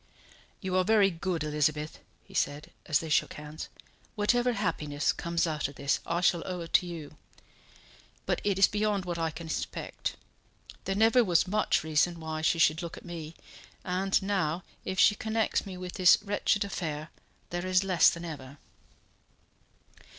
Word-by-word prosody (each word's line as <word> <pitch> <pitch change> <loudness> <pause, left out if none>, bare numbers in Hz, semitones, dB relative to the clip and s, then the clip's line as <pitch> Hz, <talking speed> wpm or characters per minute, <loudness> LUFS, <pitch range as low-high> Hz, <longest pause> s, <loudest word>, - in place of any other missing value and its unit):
"You 190 -2 -2
are 185 - +4
very 205 -1 +4
good, 170 -1 -2
Elizabeth," 150 0 -1 0.2
he - - -18
said, 145 +1 -1 0.2
as 150 - +3
they 160 - -4
shook 150 - +2
hands. 150 +1 -8 0.5
"Whatever 240 +4 +2
happiness 155 -8 -1
comes 170 0 -1
out 155 -3 -1
of 140 - -12
this 140 0 0
I 170 +1 0
shall 175 -1 +3
owe 180 -2 -4
to 165 - +3
you. 155 -3 -8 1.1
But - - 0
it 200 -2 +1
is 195 - +7
beyond 210 -2 0
what 175 -1 -3
I 165 -1 0
can 165 +1 -8
expect. 160 - -4 0.7
There 195 - -1
never 225 +4 +5
was 180 -3 +3
much 210 -3 +1
reason 160 +2 +1
why 160 -1 -4
she 160 +1 +2
should 160 0 +3
look 170 -1 -6
at - - -12
me, 165 -2 -7 0.5
and 190 +1 +1
now, 185 -4 0 0.2
if 190 - -3
she 210 - +7
connects 220 0 -1
me 185 -2 -7
with 180 0 -6
this 185 -2 +6
wretched 205 0 +1
affair, 155 -5 -4 0.4
there 175 +1 -3
is 185 +1 +3
less 185 -3 +5
than 170 0 -5
ever." 140 -4 -8
175 Hz, 165 wpm, -29 LUFS, 155-195 Hz, 1.1 s, is